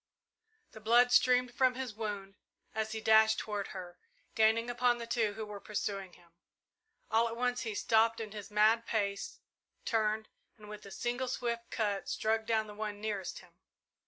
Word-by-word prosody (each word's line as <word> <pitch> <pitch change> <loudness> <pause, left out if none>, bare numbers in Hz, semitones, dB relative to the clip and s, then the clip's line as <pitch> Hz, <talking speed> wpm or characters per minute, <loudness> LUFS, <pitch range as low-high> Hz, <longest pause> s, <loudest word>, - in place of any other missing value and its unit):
The - - -11
blood 240 +3 +4
streamed 250 0 +4
from 255 0 +3
his 255 -3 -4
wound 205 -2 -5 0.4
as 220 0 -2
he 220 - -4
dashed 220 0 +5
toward 205 -2 -3
her, 180 -2 -9 0.3
gaining 220 +1 +3
upon 245 0 +2
the 235 - -6
two 230 -3 0
who 220 +1 -5
were 210 -1 -8
pursuing 195 -3 -4
him. 170 -1 -20 0.8
All 225 +1 +4
at 230 - -5
once 245 0 0
he 220 -3 -4
stopped 225 +1 +3
in 220 -2 -5
his 205 -1 -8
mad 215 +2 +3
pace, 200 -3 -2 0.4
turned, 220 -1 0 0.3
and 210 -1 -13
with 210 -1 -9
a - - -11
single 245 +4 -2
swift 235 -2 -3
cut 205 -3 -2
struck 220 0 0
down 220 -1 +2
the 210 - -10
one 210 -1 -5
nearest 205 -4 -4
him. 175 -1 -20
220 Hz, 175 wpm, -32 LUFS, 210-235 Hz, 0.8 s, dashed